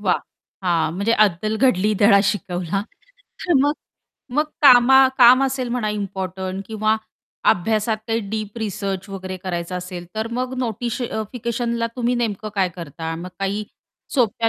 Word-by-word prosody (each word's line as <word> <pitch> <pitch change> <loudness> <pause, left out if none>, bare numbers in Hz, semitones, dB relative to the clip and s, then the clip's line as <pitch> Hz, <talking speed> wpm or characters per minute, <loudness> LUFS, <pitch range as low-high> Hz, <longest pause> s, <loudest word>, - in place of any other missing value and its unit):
वाह! 190 -3 +2 0.5
हां, 165 -3 +1
म्हणजे 200 +5 +1
अद्दल 215 0 +2
घडली, 215 -5 +3
धडा 200 -1 +6
शिकवला. 185 -1 -1 0.8
मग 290 +1 +3 0.6
मग 300 +2 +3 0.2
कामा 265 0 +8
काम 250 +1 +8
असेल 260 -2 -2
म्हणा 235 -3 -1
इम्पोर्टंट 190 -2 -4
किंवा 215 0 +1 0.5
अभ्यासात 215 +4 +1
काही 225 +1 +1
डीप 215 +1 -4
रिसर्च 200 -3 -3
वगैरे 185 -1 -6
करायचं 180 -1 -4
असेल, 180 -1 -7
तर 220 +1 -2
मग 255 +1 -2
नोटिश 235 0 -2 0.3
फिकेशनला 235 -1 -2
तुम्ही 245 0 +1
नेमकं 220 -3 -2
काय 190 -2 +2
करता? 165 0 -5
मग 175 +2 -7
काही 200 +2 -2 0.5
सोप्या 230 -3 +2
215 Hz, 135 wpm, -21 LUFS, 185-235 Hz, 0.8 s, कामा